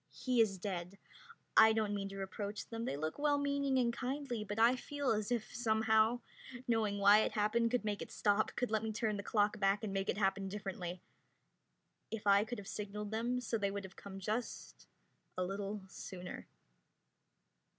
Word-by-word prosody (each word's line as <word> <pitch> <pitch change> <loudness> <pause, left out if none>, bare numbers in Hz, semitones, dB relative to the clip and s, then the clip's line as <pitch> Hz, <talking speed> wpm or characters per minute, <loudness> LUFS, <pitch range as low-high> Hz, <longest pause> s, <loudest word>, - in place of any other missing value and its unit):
He 250 -2 +2
is 200 -4 +2
dead. 180 0 -4 0.6
I 220 0 +8
don't 215 -2 0
mean 195 -1 -2
to 195 - -8
reproach 200 +2 -4
them 230 0 -4
they 140 - -2
look 155 - -3
well 290 -1 +3
meaning 280 -1 +1
and 240 -2 +2
kindly 255 -2 -3
but 205 0 -5
I 230 +3 +6
feel 285 +1 -2
as 215 +1 0
if, 235 -3 -1
somehow, 220 0 +3 0.5
knowing 220 -3 +1
why 200 +1 +7
it 215 - +1
happened 225 +2 +2
could 245 -2 0
make 205 -1 -1
it - - -6
stop, 205 0 +1
could 250 -2 -1
let 220 -1 +2
me 220 -1 -2
turn 215 0 -1
the - - -3
clock 210 0 +1
back 195 +2 +2
and 205 -3 -3
make 195 0 -1
it - - 0
happen 195 -1 +1
differently. 185 -3 -5 1.1
If 225 -2 -5
I 200 0 +6
could 240 +2 -5
have 200 - -8
signaled 210 0 -5
them, 235 +3 0
so 230 -1 -1
they 200 -1 +1
would 200 0 -4
have 190 0 -10
come 195 -1 -9
just 215 +5 -4 0.5
a 185 - +1
little 200 +2 -3
sooner. 180 -1 -8
210 Hz, 190 wpm, -35 LUFS, 200-230 Hz, 1.1 s, I